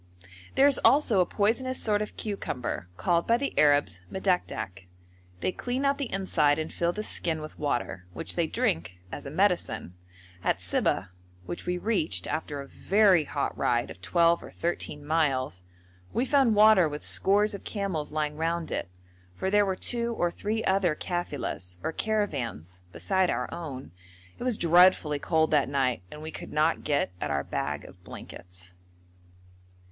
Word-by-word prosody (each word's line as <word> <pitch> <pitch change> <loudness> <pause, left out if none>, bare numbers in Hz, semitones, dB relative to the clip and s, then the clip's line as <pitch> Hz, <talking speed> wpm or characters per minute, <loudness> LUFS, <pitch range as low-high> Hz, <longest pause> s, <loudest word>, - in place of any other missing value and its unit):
There 270 - +6
is 285 -2 +4
also 270 -8 +5
a 180 - +3
poisonous 250 +5 0
sort 210 -1 +1
of 210 - -5
cucumber, 145 - -4
called 170 -1 +1
by 230 - +4
the 280 +2 -2
Arabs 145 - +3
madakdak. 180 - -2 0.5
They - - +1
clean 250 +7 -3
out 275 +1 +2
the 275 -4 -3
inside 155 -7 +2
and 155 0 -4
fill 170 0 +1
the 210 +4 -4
skin 165 -6 -1
with 155 0 -9
water, 120 -10 -2
which - - -4
they - - +1
drink 85 +3 -1
as - - -6
a - - -4
medicine. 165 - 0 0.5
At - - +1
Sibeh, 95 +2 0 0.4
which 85 - -6
we 180 0 0
reached 160 - 0
after 145 -3 -3
a 140 - -10
very 195 -4 +3
hot 140 0 -2
ride 120 0 0
of 90 - -12
twelve 170 - +3
or - - -10
thirteen 150 -3 -3
miles, 135 - 0 0.5
we 245 - +1
found 265 -5 +3
water 210 -5 +6
with 150 0 -6
scores 205 +2 +3
of 200 - -7
camels 190 -9 -3
lying 150 -1 -2
round 165 +1 -1
it, - - -3 0.5
for 190 - -2
there 205 0 +4
were 190 - 0
two 235 +4 0
or 175 -4 +1
three 220 +5 -2
other 190 -4 +2
kafilas, 145 - -4
or - - -1
caravans, 125 - -2
beside 190 - +1
our 125 +1 -1
own. 135 - -7 0.5
It - - -5
was 250 -4 0
dreadfully 170 -3 +5
cold 160 +1 +1
that 150 -3 +3
night, 130 -7 0
and 150 - -10
we 160 - -5
could - - -8
not 155 +2 +1
get 140 -9 +1
at 75 - -2
our 70 -1 0
bag - - -3
of - - -15
blankets. 90 0 -10
165 Hz, 170 wpm, -28 LUFS, 140-205 Hz, 0.5 s, There